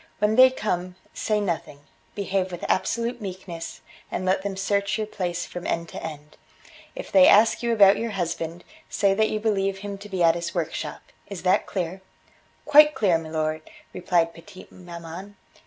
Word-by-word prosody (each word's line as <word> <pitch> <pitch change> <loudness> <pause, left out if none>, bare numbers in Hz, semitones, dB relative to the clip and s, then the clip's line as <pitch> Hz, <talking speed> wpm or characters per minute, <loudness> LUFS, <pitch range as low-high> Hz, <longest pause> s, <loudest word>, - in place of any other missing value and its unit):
When 210 +1 +1
they 260 +2 +8
come, 180 -7 -3 0.2
say 215 -1 0
nothing; 170 -7 -3 0.3
behave 190 -2 -1
with 175 - -6
absolute 235 +4 -1
meekness, 180 -4 -7 0.3
and 185 - -3
let 185 +1 +2
them 195 -1 -4
search 200 +1 0
your 215 - -2
place 180 -4 -3
from 175 0 -7
end 170 -1 -2
to - - -8
end. 150 -1 -8 0.6
If - - -8
they 280 -1 +7
ask 215 +1 +5
you 235 -1 0
about 200 -3 +6
your 230 - -2
husband 170 -3 -4 0.3
say 200 -1 +2
that 220 +2 +2
you 215 - -2
believe 195 -3 0
him 200 -1 -6
to 210 +1 -11
be 185 -3 -1
at 165 -1 +6
his 170 +1 -5
workshop. 165 -2 -4 0.2
Is 200 -3 -8
that 185 0 +2
clear?" 185 0 -4 0.6
"Quite 300 0 +7
clear, 180 -6 +2
milor," 155 -1 -3 0.3
replied 170 -2 +1
petite 175 +2 -14
maman. 175 +2 -10
190 Hz, 170 wpm, -24 LUFS, 170-210 Hz, 0.6 s, they